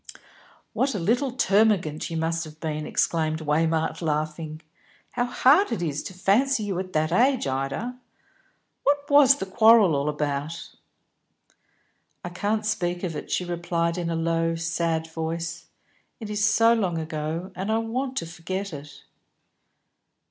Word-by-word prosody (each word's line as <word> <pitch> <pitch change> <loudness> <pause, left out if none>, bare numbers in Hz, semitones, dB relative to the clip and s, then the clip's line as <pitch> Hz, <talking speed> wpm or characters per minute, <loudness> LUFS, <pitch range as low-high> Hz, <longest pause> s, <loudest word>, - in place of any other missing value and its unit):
"What 270 -2 0
a - - -1
little 245 +10 +1
termagant 200 - +2
you 165 - -3
must 165 +1 -1
have 155 0 -13
been!" 155 -2 -3
exclaimed 155 -2 0
Waymark, 160 +2 0
laughing. 155 0 -3 0.5
"How 245 - 0
hard 275 +9 +4
it 220 -7 -2
is 150 -3 -2
to - - -8
fancy 220 +7 +2
you 195 -3 -2
at 185 0 -6
that 155 +1 +1
age, 255 +7 +3
Ida. 135 - -3 0.8
What 285 0 +1
was 285 -1 +7
the 195 - -4
quarrel 215 -3 +5
all 140 +2 0
about?" 150 +2 -3 1.5
"I - - -3
can't 210 +4 -1
speak 175 -4 -1
of 170 -4 -3
it," - - -6
she 180 - -1
replied, 170 -1 -1
in 175 -2 -3
a 165 - -1
low, 165 0 0
sad 165 -1 -1
voice. 165 +1 -5 0.5
"It 215 -3 -6
is 210 0 -1
so 225 +3 +5
long 190 -7 0
ago; 160 +3 -4
and 190 +4 -3
I 220 - +2
want 255 +4 -3
to - - -1
forget 180 +3 -5
it." 145 0 -10
170 Hz, 150 wpm, -25 LUFS, 160-215 Hz, 1.5 s, was